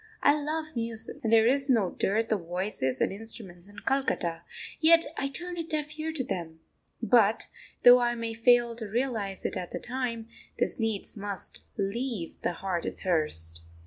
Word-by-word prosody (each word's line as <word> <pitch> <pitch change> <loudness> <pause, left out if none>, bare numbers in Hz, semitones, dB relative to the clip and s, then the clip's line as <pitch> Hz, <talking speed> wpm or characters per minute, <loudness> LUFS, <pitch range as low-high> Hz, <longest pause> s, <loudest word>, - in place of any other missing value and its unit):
I 285 - +7
love 310 +1 -3
music, 230 -1 -4
and 225 - 0
there 225 -1 +6
is 275 +3 +5
no 220 -8 +3
dearth 220 +3 0
of 190 -6 -1
voices 175 -8 0
and - - +2
instruments 195 -3 -7
in 205 - -16
Calcutta, 175 -11 0 0.4
yet 330 +1 +7
I 275 - -1
turn 350 +5 -6
a 335 - -2
deaf 310 -1 -3
ear 320 +1 -2
to 290 -5 -1
them. 170 -10 -5 0.4
But, 225 -2 +4 0.4
though 245 0 +9
I 240 0 +1
may 230 -1 -3
fail 235 0 +4
to 220 -3 -5
realise 220 -5 -1
it - - -1
at 175 - -4
the - - -5
time, 240 -3 -3 0.3
this - - 0
needs 225 -3 -1
must 200 -2 -6
leave 210 -2 -3
the - - -1
heart 180 -1 -3
athirst. 85 - -1
225 Hz, 175 wpm, -28 LUFS, 195-260 Hz, 0.4 s, though